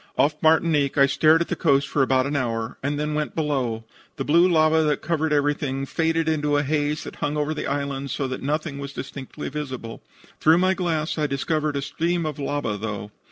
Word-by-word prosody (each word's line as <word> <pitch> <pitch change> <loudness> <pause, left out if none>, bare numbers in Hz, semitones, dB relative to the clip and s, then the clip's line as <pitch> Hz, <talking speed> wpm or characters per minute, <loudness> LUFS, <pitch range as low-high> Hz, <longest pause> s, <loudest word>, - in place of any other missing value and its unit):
Off 145 +2 +3
Martinique 155 -3 +3
I 140 - +7
stared 155 +4 +4
at 170 - 0
the - - -2
coast 140 -3 +2
for 145 - 0
about 130 -1 +3
an 145 +1 -2
hour, 115 -3 -2
and 145 +2 -2
then 150 0 -1
went 150 0 -2
below. 130 -8 -1 0.3
The - - -3
blue 170 +5 +5
lava 160 -1 +4
that 150 -2 0
covered 160 -1 0
everything 145 -2 0
faded 165 +2 0
into 150 -2 +1
the 145 - +2
haze 150 +1 -1
that - - -9
hung 145 +1 -2
over 150 +1 0
the - - -4
island 140 -1 -2
so 135 +2 -2
that 130 - -4
nothing 150 +1 -2
was 140 0 -6
distinctly 135 -1 -7
visible. 130 -6 -6 0.4
Through 160 +2 +5
my 185 +1 +3
glass 165 -4 -1
I 150 - +1
discovered 150 +2 -1
a 140 - -1
stream 170 +3 -1
of 150 -2 -4
lava, 140 -6 -2
though. 105 -1 -5
145 Hz, 205 wpm, -24 LUFS, 140-155 Hz, 0.4 s, I